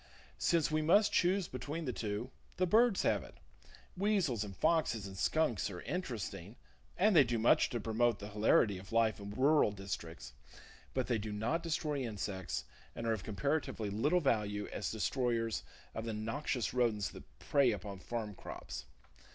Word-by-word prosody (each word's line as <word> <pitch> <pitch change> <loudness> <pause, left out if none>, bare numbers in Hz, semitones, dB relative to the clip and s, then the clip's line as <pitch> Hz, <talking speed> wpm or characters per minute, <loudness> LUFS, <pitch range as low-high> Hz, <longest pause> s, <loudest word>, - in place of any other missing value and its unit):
Since 165 -3 +2
we 155 0 +2
must 200 +7 +4
choose 185 +1 +3
between 150 +6 -5
the 125 - -2
two, 110 +4 -3 0.3
the 185 - +3
birds 220 +3 +4
have - - +2
it! - - -13 0.6
Weasels 185 - +1
and 100 -3 -8
foxes 135 - +2
and 95 -1 -8
skunks 120 0 +1
are 90 -3 -7
interesting, 110 - -4 0.4
and 205 +1 +4
they 150 - +9
do 120 -2 -1
much 115 +2 +4
to 120 - -2
promote 115 +1 +1
the 105 - -8
hilarity 105 -1 +3
of 95 0 -13
life 115 -2 +2
in 100 0 -7
rural 135 +3 +4
districts, 95 -8 -6 0.6
but 130 -1 +1
they 120 -3 0
do 105 +1 -5
not 115 +11 -1
destroy 155 -3 -1
insects, 100 -6 -3 0.3
and 115 - -5
are 115 - +2
of 105 -4 -4
comparatively 110 -1 -1
little 150 - +2
value 105 -7 0
as 100 - -2
destroyers 115 0 0 0.3
of 110 - -4
the 115 - -3
noxious 115 +3 -2
rodents 115 -5 +1
that - - -14
prey 140 -4 +3
upon 100 -1 -5
farm 110 +1 -4
crops. 75 - -8
115 Hz, 170 wpm, -34 LUFS, 105-150 Hz, 0.6 s, they